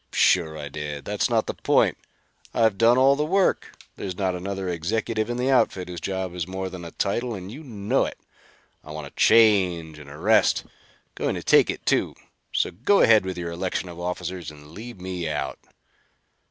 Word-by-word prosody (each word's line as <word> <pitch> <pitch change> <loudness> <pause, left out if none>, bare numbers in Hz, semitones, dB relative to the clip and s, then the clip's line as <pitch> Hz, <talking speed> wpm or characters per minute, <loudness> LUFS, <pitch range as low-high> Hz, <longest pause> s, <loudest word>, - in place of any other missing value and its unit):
"Sure 80 -1 +3
I 75 -1 -6
did. 75 -1 -6
That's - - 0
not - - +2
the - - -3
point. - - +2 0.6
I've 110 -3 +3
done 115 +2 +5
all 135 +2 +5
the 150 - 0
work. 190 +5 +1 0.2
There's 95 -2 -5
not 95 -2 0
another 95 +1 -4
executive 110 +6 -1
in 120 - -2
the 130 +2 +1
outfit 110 -8 +2
whose 90 -2 -6
job 95 -2 -3
is 90 -1 -4
more 95 0 -4
than 90 -2 -8
a 85 - -7
title, 115 +7 -2
and 95 0 -8
you 145 +7 -9
know 115 -1 0
it. - - -6 0.7
I - - -14
want 75 -1 -6
a - - -11
change 90 -8 +3
and 75 -1 -12
a 75 - -10
rest. 105 +7 +3 0.5
Going - - -2
to - - -5
take - - +5
it, - - -4
too. - - +1 0.4
So, - - 0
go 135 - +2
ahead 110 -4 +6
with 95 - -4
your 85 -1 -4
election 90 +1 -3
of 85 0 -9
officers 90 -1 -4
and 75 0 -14
leave 115 +4 -9
me 90 -3 -4
out." 75 - -3
95 Hz, 195 wpm, -24 LUFS, 85-110 Hz, 0.7 s, ahead